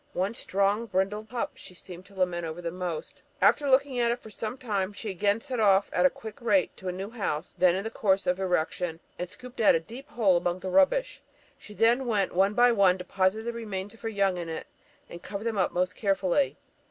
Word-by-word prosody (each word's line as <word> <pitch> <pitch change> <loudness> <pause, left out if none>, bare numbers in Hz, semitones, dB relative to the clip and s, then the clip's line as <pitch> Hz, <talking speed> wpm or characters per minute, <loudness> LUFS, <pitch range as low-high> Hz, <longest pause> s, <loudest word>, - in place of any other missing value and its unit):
One 190 +4 -1
strong 200 +2 0
brindled 205 +3 -1
pup 240 -1 -2
she 180 - -13
seemed 180 +1 -11
to 200 - -18
lament 180 -2 0
over 165 +1 -5
the 170 -1 -4
most. 175 -3 -5 0.2
After 290 -2 +4
looking 265 -1 +3
at 235 -1 +3
it 235 - 0
for 220 - -13
some 220 +4 -5
time, 205 -6 -2
she 205 +1 -5
again 200 +4 +1
set 255 -3 -4
off 200 -2 +4
at 180 +1 +5
a - - 0
quick 220 +3 -10
rate 205 -5 +2
to 190 - -8
a - - 0
new 190 +4 -6
house 185 -8 -3
then 180 -1 +4
in 195 - -2
the 225 - -4
course 195 -3 +1
of 180 +1 +1
erection, 175 -2 -1 0.2
and 180 - -3
scooped 250 +4 -12
out 215 - +6
a - - +2
deep 235 - -11
hole 200 -7 +3
among 175 +1 -2
the 185 - -4
rubbish. 290 - +2 0.3
She 210 - -14
then, 240 +4 +3
one 200 -2 +1
by 245 0 +6
one, 195 -5 +4
deposited 190 +4 0
the 235 - -2
remains 205 -3 -5
of 225 - -18
her 225 - -3
young 195 -3 +1
in 170 -1 -5
it, 160 - -5 0.4
and 170 - -10
covered 200 +2 -6
them 225 -3 -1
up 185 - +2
most 180 +1 -1
carefully. 195 +5 +1
200 Hz, 225 wpm, -28 LUFS, 180-225 Hz, 0.4 s, out